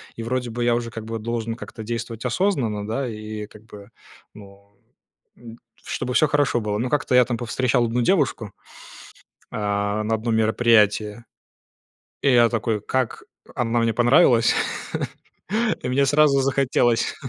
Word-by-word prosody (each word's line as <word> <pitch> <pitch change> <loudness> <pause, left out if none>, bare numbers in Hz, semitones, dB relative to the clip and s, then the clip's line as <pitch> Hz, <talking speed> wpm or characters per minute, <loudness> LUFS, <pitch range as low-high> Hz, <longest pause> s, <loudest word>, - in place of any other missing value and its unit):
и 115 - -6
вроде 125 0 -2
бы 120 +1 -3
я 120 0 +3
уже 120 -1 -3
как 110 -1 -7
бы 115 0 -5
должен 115 0 -3
как-то 115 -2 -9
действовать 115 0 -5
осознанно, 120 - 0
да, 125 +4 -2
и 110 -1 -6
как 105 +1 -17
бы, 105 -1 -13 0.4
ну 100 0 -16 0.6
н 115 -1 -12 0.3
чтобы 125 - -4
всё 155 +3 +4
хорошо 145 -4 +1
было. 105 -1 -2
Но 125 +3 -2
как-то 145 -3 0
я 125 -1 +6
там 120 -2 -3
повстречал 120 0 0
одну 120 +2 -1
девушку, 130 - +1 1.0
а, 105 0 -1
на 110 +1 0
одном 110 +1 -1
мероприятии, 110 -1 +2 1.0
и 140 - +3
я 120 -1 +5
такой 110 -2 -1
как 130 +2 -2 0.3
она 120 -1 0
мне 115 -1 +1
понравилась, 120 -1 +4 1.3
и - - -3
мне 140 +2 +2
сразу 145 -1 +4
захотелось, 130 -3 +1
115 Hz, 150 wpm, -22 LUFS, 110-125 Hz, 1.3 s, я